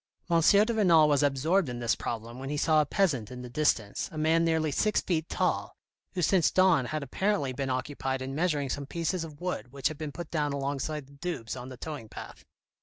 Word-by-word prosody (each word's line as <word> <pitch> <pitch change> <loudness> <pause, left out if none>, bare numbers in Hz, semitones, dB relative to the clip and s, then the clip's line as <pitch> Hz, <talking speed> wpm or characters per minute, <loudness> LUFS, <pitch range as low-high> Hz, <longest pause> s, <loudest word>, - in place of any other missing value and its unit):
M. 165 -1 +4
de 200 +5 +6
Renal 170 -8 +5
was 145 -2 +3
absorbed 145 +5 +2
in 120 - -4
this 120 -1 +1
problem 115 +2 -5
when 135 +1 -5
he 150 - -2
saw 155 +1 +4
a 150 - -2
peasant 145 - +1
in 125 -1 -8
the 125 - -9
distance, 120 -8 0
a 155 - -8
man 160 +2 +3
nearly 160 -2 +1
six 215 +9 +2
feet 165 -3 -1
tall, - - -1 0.4
who 180 - 0
since 175 0 +4
dawn 185 -8 +4
had 155 +3 -3
apparently 165 -1 0
been 135 +1 -3
occupied 130 0 -2
in 135 +1 -5
measuring 150 -3 0
some 140 -1 -4
pieces 170 +3 -2
of 150 -3 -10
wood 180 -8 -4
which 140 -1 0
had 155 - -8
been 155 -2 -4
put 170 +2 -8
down 150 -3 0
alongside 140 +1 -3
the 140 - -20
Doubs 140 -7 -4
on 125 0 -7
the 130 - -9
towing 145 -6 -7
path. - - -10
150 Hz, 220 wpm, -29 LUFS, 135-165 Hz, 0.4 s, de